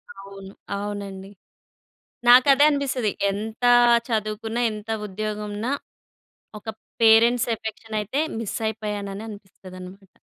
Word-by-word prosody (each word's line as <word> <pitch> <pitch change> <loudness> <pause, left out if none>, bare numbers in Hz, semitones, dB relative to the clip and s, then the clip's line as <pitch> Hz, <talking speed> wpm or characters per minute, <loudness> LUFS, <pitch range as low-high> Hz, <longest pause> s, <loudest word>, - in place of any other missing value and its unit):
అవును. 195 0 -11 0.3
అవునండి. 200 -1 -6 1.0
నాకదే 265 +3 +7
అనిపిస్తది. 265 -6 -1 0.2
ఎంత 220 +4 -6 0.5
చదువుకున్నా, 220 +1 -2
ఎంత 210 +1 -9 0.2
ఉద్యోగం 210 +1 -4
ఉన్నా 220 +5 -3 0.9
ఒక 210 - -23 0.4
పేరెంట్స్ 230 +2 +5
ఎఫెక్షన్ 220 0 -7
అయితే, 225 +8 -2 0.2
మిస్ 225 -3 -4
అయిపోయాను 210 -2 -4
అననిపిస్తదనమాట. 195 -2 -11
215 Hz, 95 wpm, -23 LUFS, 200-225 Hz, 1.0 s, నాకదే